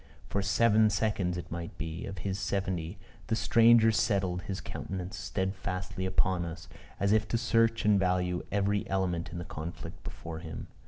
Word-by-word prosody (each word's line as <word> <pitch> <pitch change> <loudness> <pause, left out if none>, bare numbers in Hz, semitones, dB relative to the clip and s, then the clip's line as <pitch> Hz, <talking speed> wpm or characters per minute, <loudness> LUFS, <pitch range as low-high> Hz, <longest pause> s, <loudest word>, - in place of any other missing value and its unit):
For 100 - 0
seven 110 +2 +4
seconds, 100 -4 0
it 85 - -7
might 85 0 -5
be, 80 +2 -4
of 95 -1 -6
his 100 0 -1
seventy, 95 -3 -2 0.3
the 110 - +1
stranger 115 0 +6
settled 95 -5 +1
his 95 0 -4
countenance 95 0 -5
steadfastly 95 0 -3
upon 95 -1 +1
us, 85 0 -7 0.3
as 100 0 +2
if 110 0 +3
to 115 - +1
search 115 -1 +2
and 105 -2 +5
value 90 -1 +1
every 100 0 +1
element 90 -3 0
in 85 - -5
the 85 - -5
conflict 80 +2 -7
before 80 -1 -7
him. 80 -1 -7
95 Hz, 165 wpm, -30 LUFS, 90-105 Hz, 0.3 s, stranger